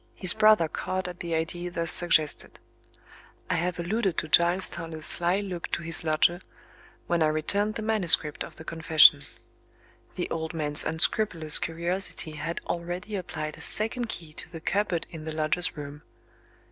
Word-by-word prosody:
His 185 -2 +4
brother 215 -6 +4
caught 185 +3 -4
at 180 -1 -9
the 170 -1 -3
idea 175 +2 -3
thus 170 -1 +1
suggested. 160 -4 +1 0.9
I - - +2
have 175 +1 -2
alluded 190 +1 -2
to - - -2
Giles 175 +4 +3
Toller's 160 -1 -6
sly 175 +3 +1
look 180 -4 -6
to - - -2
his 165 0 +1
lodger, 165 +3 +2 0.6
when 175 -1 -1
I 155 - +4
returned 200 +8 -1
the 220 - -4
manuscript 180 -8 +2
of - - -11
the 160 - -11
confession. 160 -3 +5 0.9
The - - -3
old 160 +1 -4
man's 150 -2 +5
unscrupulous 160 0 +1
curiosity 170 0 -3
had 155 +3 -5
already 175 +4 -5
applied 155 -5 -6
a - - -12
second 225 +5 +2
key 165 -8 -6
to - - -8
the 165 - -8
cupboard 180 -1 -1
in 160 -2 -9
the 160 - -5
lodger's 155 +3 -1
room. 145 0 -8
170 Hz, 160 wpm, -26 LUFS, 160-185 Hz, 0.9 s, confession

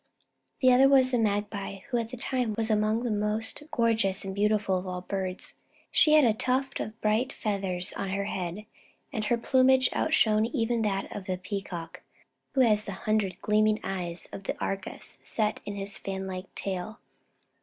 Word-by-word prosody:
The 255 -1 +6
other 265 +2 +6
was 260 -2 +5
the 245 - +2
Magpie, 205 -2 -1
who 245 - +2
at 230 -1 -2
that 250 0 -8
time 250 -5 0
was 225 -1 0
among 215 +2 +2
the 240 - -1
most 210 +4 -1
gorgeous 220 -6 +1
and 190 - -4
beautiful 205 -2 +2
of 185 - -8
all 180 0 -4
the - - -21
birds. 190 -2 -4 0.4
She 305 - +5
had 305 -3 +7
a 225 - +4
tuft 260 +4 -1
of 220 +1 -5
bright 220 +5 +1
feathers 195 -3 -2
on 195 - -3
her 200 +1 -1
head, 190 +1 -4 0.5
and 215 -1 -2
her 240 - +2
plumage 260 +2 +4
outshone 220 -8 +3
even 235 -2 0
that 195 -2 -1
of 200 - -6
the 185 -1 -2
Peacock, 185 -3 -6 0.5
who 265 - +5
has 215 -4 +4
the 200 - -5
hundred 210 -4 +1
gleaming 215 0 +3
eyes 180 -3 -4
of 195 - -8
Argus 195 0 -5
set 215 -2 -1
in 205 - -4
his 200 0 -5
fan 195 0 -4
like 185 0 -7
tail. 195 +3 -4
210 Hz, 180 wpm, -28 LUFS, 195-230 Hz, 0.5 s, had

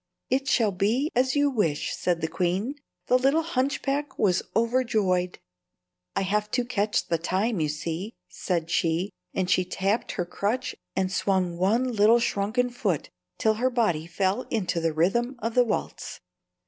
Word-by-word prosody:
"It 270 +2 +1
shall 225 -6 +3
be 220 - +1
as 255 +2 +2
you 285 0 +3
wish," 170 - 0
said 175 -2 0
the 160 - 0
queen. 185 - -1 0.3
The 250 - +3
little 275 +5 +3
hunchback 280 -1 -1
was 190 -3 +2
overjoyed. 220 -7 +1 0.8
"I - - +1
have 210 +2 0
to 245 - +1
catch 215 -3 0
the 165 - 0
time, 195 +5 0
you 155 -1 +1
see," 165 +8 -4
said 170 -3 -2
she, 170 +4 +1 0.2
and 185 -1 0
she 185 0 +3
tapped 195 +4 -1
her 180 - -2
crutch 225 +8 -2 0.2
and 190 -1 0
swung 185 -2 +1
one 200 +8 +2
little 220 +2 +5
shrunken 230 +3 0
foot 210 - -2 0.3
till 220 - +3
her 255 - +3
body 175 -11 0
fell 190 +7 -1
into 185 -6 0
the 165 -1 +1
rhythm 215 - +1
of 230 0 -3
the 250 - +5
waltz. 225 -3 -4
205 Hz, 160 wpm, -26 LUFS, 180-245 Hz, 0.8 s, little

